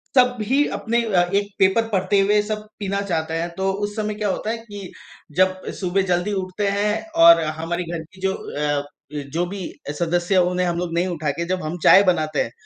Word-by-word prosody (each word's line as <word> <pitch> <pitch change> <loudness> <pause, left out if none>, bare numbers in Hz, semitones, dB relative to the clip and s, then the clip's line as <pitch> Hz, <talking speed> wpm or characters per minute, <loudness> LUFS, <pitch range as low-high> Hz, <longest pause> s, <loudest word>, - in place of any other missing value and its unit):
सब 250 -1 +5
भी 265 +7 +2
अपने 235 +1 0
अ, 180 -6 +2
एक 200 0 +1
पेपर 195 +4 +3
पढ़ते 200 0 +1
हुए 205 +2 +3
सब 210 0 -4
पीना 200 -1 -1
चाहते 160 -5 -2
हैं 165 +1 -1
तो 190 0 +1
उस 205 0 -3
समय 215 -1 -2
क्या 210 -1 -1
होता 210 +3 -2
है 230 - -1
कि 205 -4 -10 0.5
जब 185 0 +3 0.2
सुबह 185 0 +1
जल्दी 180 +4 0
उठते 185 +2 -3
हैं 210 +1 +1 0.3
और 170 0 +8 0.2
हमारी 175 +2 -2
घर 165 -2 -4
की 190 - -16
जो 190 0 +1
अ, 145 -4 -2 0.3
जो 150 +4 -2
भी 195 +1 -6 0.4
सदस्य 175 +2 +1
उन्हें 180 0 0
हम 170 -1 -1
लोग 175 -1 -3
नहीं 175 +2 +1
उठा 160 -4 -2
के 170 +4 -4
जब 185 +1 -2
हम 155 +3 -4
चाय 195 - +8
बनाते 155 -5 +1
हैं। 115 - -7
185 Hz, 210 wpm, -22 LUFS, 170-205 Hz, 0.5 s, और